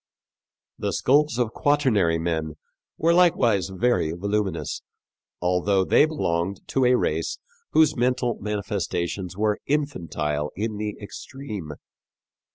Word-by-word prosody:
The - - -1
skulls 145 0 +3
of 120 -3 0
Quaternary 125 - +2
men 80 -2 -2 0.4
were 165 +1 +3
likewise 120 - +3
very 95 -4 +1
voluminous, 100 -1 -2 0.6
although 90 +2 +2
they 150 - +5
belonged 95 - -1
to 135 -1 +2
a 125 0 +5
race 80 -5 -1 0.4
whose 155 -1 +5
mental 125 -1 0
manifestations 100 -3 -3
were 105 0 +1
infantile 85 - -1
in 105 +1 -3
the 105 0 -4
extreme. 105 - -7
105 Hz, 110 wpm, -24 LUFS, 90-125 Hz, 0.6 s, they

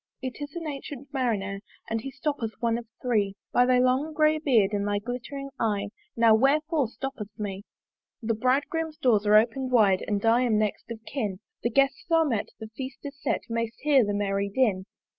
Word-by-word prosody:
It 260 +2 -6
is 290 +1 -6
an 340 - -4
ancyent 280 -2 -6
Marinere, 205 -7 -1 0.3
And 225 0 -2
he 270 - -5
stoppeth 270 -5 -3
one 230 0 +1
of 235 - -11 0.2
three: 210 -6 +1 0.2
"By 245 0 +4
thy 255 0 +4
long 255 +5 +2
grey 310 0 +3
beard 230 -9 +3
and 205 0 0
thy 205 0 +1
glittering 250 +5 -5
eye 205 -3 0 0.3
"Now 230 -1 +6
wherefore 290 +4 +3
stoppest 225 -4 -7
me? 200 -2 -5 0.5
"The 230 -2 -1
Bridegroom's 290 +7 0
doors 225 -8 +2
are 210 - +6
open'd 240 +4 +1
wide 205 -6 +4
"And 205 0 -1
I 230 +2 +5
am 235 -4 +2
next 215 +1 -1
of 225 -1 -8
kin; 215 -9 -3 0.2
"The 235 - +1
Guests 275 +3 +1
are 330 -1 +4
met, 230 -8 -1
the 220 -1 -8
Feast 260 0 -6
is 280 -1 -8
set, - - 0
"May'st 230 0 -3
hear 285 -3 +5
the 205 -1 -1
merry 200 0 0
din. 200 -4 +1
240 Hz, 195 wpm, -27 LUFS, 210-275 Hz, 0.5 s, Now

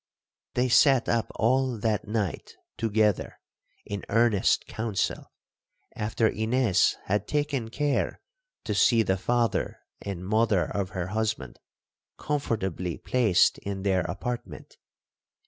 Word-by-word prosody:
They 125 +1 +2
sat 130 +2 +5
up 115 -1 0
all 130 +1 +1
that 110 0 -1
night 105 -6 -3 0.2
together 110 -2 0 0.5
in 100 0 -5
earnest 115 -2 +3
counsel, 110 -3 -3 0.6
after 110 +1 +1
Ines 110 -1 +2
had 105 +2 -1
taken 145 -6 -1
care 145 +3 -1 0.4
to - - -2
see 115 -2 +4
the 95 -2 +1
father 120 +4 0 0.2
and 95 -3 -5
mother 110 -2 +2
of 100 -2 -3
her 90 0 -2
husband 110 - -2 0.6
comfortably 95 - -2
placed 115 -8 +2
in 100 -1 -5
their 95 -2 +2
apartment. 120 +7 -5
110 Hz, 110 wpm, -27 LUFS, 100-120 Hz, 0.6 s, sat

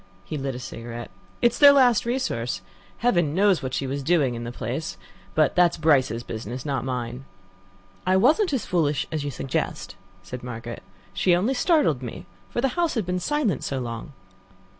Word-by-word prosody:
He 155 - -5
lit 135 -3 -3
a - - -5
cigarette. 120 -1 -7 0.3
"It 240 - +6
is - - -7
their 285 -1 +10
last 245 -5 +4
resource. 235 - -1 0.3
Heaven 175 -11 +2
knows 195 -3 +4
what 130 -2 -3
she 135 - -1
was 140 +2 -3
doing 140 -4 +2
in 120 0 -5
the 120 - -4
place; 130 +6 -4 0.4
but 155 -2 +3
that's 175 -1 +4
Bryce's 135 -7 +2
business, 120 +4 -6
not 135 -5 -1
mine." 125 0 -4 0.8
"I 185 +1 +3
wasn't 310 - +4
as 265 -5 -1
foolish 150 -6 +1
as 155 -2 -2
you 145 - -2
suggest," 130 0 -3 0.3
said 120 +7 -7
Margaret. 120 -1 -7 0.3
"She 175 - +3
only 205 +9 +1
startled 270 - +2
me, 120 -3 -7 0.2
for 240 - -2
the 270 - +2
house 340 +3 0
had 220 -5 0
been 180 +1 -1
silent 230 - 0
so 135 - -2
long." 120 +2 -5
145 Hz, 185 wpm, -25 LUFS, 125-205 Hz, 0.8 s, their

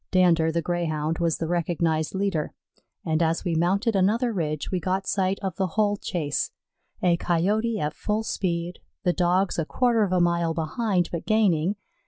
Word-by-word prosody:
Dander, 170 -3 +3
the 170 0 -1
Greyhound, 160 -2 -1
was 170 -2 +1
the 165 - -2
recognized 165 -1 0
leader, 190 -6 -1 0.5
and 160 0 +1
as 165 0 +1
we 175 - 0
mounted 195 +7 +1
another 225 +5 +2
ridge 155 -5 -2
we 185 - 0
got 190 +2 -1
sight 190 0 0
of 190 -3 -3
the 190 - +1
whole 205 -1 +3
chase 160 -7 -2 0.5
a 175 -2 +4
Coyote 210 +7 0
at 150 -3 -1
full 215 +1 -2
speed, 175 -4 -2 0.2
the 180 -2 +2
Dogs 180 +1 +1
a 160 - 0
quarter 240 +4 +2
of 200 -3 +1
a 185 - +3
mile 170 -1 +1
behind, 180 +3 0
but 170 - -5
gaining. 200 -4 +2
175 Hz, 175 wpm, -25 LUFS, 165-195 Hz, 0.5 s, a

